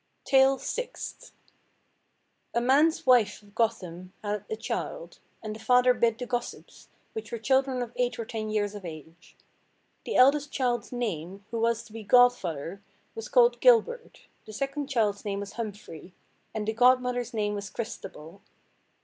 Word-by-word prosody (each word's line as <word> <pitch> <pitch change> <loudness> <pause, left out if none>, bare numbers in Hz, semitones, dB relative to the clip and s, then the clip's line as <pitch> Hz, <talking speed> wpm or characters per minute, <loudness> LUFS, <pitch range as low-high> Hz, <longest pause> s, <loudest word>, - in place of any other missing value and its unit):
TALE 270 0 +5
SIXTH. - - -6 1.2
A - - +4
man's 285 +7 +3
wife 230 -5 +4
of 205 -1 -20
Gotham 185 -5 -2
had 205 -1 -2
a 440 - -2
child, - - -5 0.2
and 215 -1 -5
the - - -10
father 250 +2 +4
bid 230 -2 +1
the 250 - -5
gossips, 245 0 -6 0.2
which 445 - -6
were 235 - -3
children 265 +2 +1
of 240 -1 -9
eight 245 -1 0
or 230 - -4
ten 220 -1 -4
years 210 -1 -1
of 205 -2 -8
age. 160 0 -11 0.7
The - - -3
eldest 285 +3 +5
child's 245 -2 -1
name, 200 -5 -4
who 230 - -2
was 230 0 +1
to 225 - -17
be 225 - -7
godfather, 200 - +2 0.3
was 450 - -7
called 485 -1 +4
Gilbert, 485 0 +3 0.3
the 215 - -9
second 275 +4 -3
child's 215 -6 0
name 200 -1 -3
was 200 0 -7
Humphrey, 205 -6 -8 0.4
and 215 -1 -4
the 220 - 0
godmother's 250 0 +3
name 210 -2 -1
was 200 -1 -5
Christabel. 190 -5 -8
230 Hz, 160 wpm, -28 LUFS, 205-255 Hz, 1.2 s, TALE